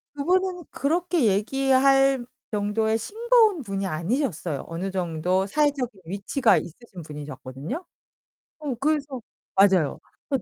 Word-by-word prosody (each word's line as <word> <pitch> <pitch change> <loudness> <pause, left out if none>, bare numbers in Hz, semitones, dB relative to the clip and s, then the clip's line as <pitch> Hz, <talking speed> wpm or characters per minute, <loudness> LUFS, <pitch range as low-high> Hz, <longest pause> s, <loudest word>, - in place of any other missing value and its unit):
그분은 360 +3 0
그렇게 335 0 +1
얘기할 270 +5 +3 0.3
정도의 220 +2 +1
싱거운 440 - +3
분이 195 -2 -3
아니셨어요. 170 - -2
어느 180 +4 -4
정도 180 +1 0
사회적인 265 -6 0
위치가 200 - +2
있으신 185 +1 -7
분이셨거든요? 150 - -7 0.8
어 290 -4 -3
그래서 285 -3 -1 0.3
맞아요. 190 -7 +4 0.3
그래서 270 -5 0
235 Hz, 300 characters per minute, -25 LUFS, 190-290 Hz, 0.8 s, 맞아요